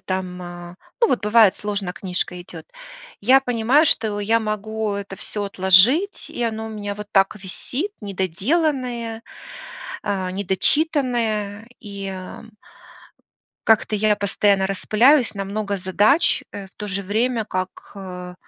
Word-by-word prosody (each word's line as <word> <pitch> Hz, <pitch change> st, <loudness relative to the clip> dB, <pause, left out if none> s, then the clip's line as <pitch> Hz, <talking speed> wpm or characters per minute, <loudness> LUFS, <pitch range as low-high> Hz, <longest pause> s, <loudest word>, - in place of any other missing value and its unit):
там, 185 Hz, -1 st, -4 dB
а, 175 Hz, 0 st, -9 dB, 0.2 s
ну, 465 Hz, -, +5 dB
вот 245 Hz, -, 0 dB
бывает, 210 Hz, -1 st, +5 dB
сложно 200 Hz, -3 st, -4 dB
книжка 180 Hz, -1 st, -3 dB
идёт. -, -, -11 dB, 0.6 s
Я 260 Hz, +6 st, +6 dB
понимаю, 250 Hz, +4 st, +3 dB
что 215 Hz, -6 st, +1 dB
я 225 Hz, +3 st, +2 dB
могу 215 Hz, 0 st, -3 dB
это 200 Hz, -1 st, -5 dB
всё 205 Hz, -1 st, -3 dB
отложить, 200 Hz, -, +3 dB
и 240 Hz, -, -5 dB
оно 220 Hz, -1 st, -2 dB
у -, -, -6 dB
меня 205 Hz, -2 st, -5 dB
вот 210 Hz, 0 st, -8 dB
так 195 Hz, +1 st, +3 dB
висит 245 Hz, -, -4 dB
недоделанное, 230 Hz, -, -1 dB, 0.8 s
а, 190 Hz, -3 st, -2 dB
недочитанное. 220 Hz, -, +1 dB
И 200 Hz, -2 st, -6 dB, 1.5 s
как-то 220 Hz, -1 st, +3 dB
я 210 Hz, 0 st, +2 dB
постоянно 200 Hz, -1 st, +1 dB
распыляюсь 230 Hz, +6 st, +3 dB
на 195 Hz, -, -3 dB
много 200 Hz, 0 st, -3 dB
задач, 205 Hz, -, +2 dB
э, 200 Hz, -1 st, -7 dB
в -, -, -25 dB
то 210 Hz, -, -5 dB
же 200 Hz, 0 st, -3 dB
время 225 Hz, +3 st, 0 dB
как, 185 Hz, -2 st, -5 dB
э, 180 Hz, -2 st, -8 dB
205 Hz, 135 wpm, -22 LUFS, 195-230 Hz, 1.5 s, Я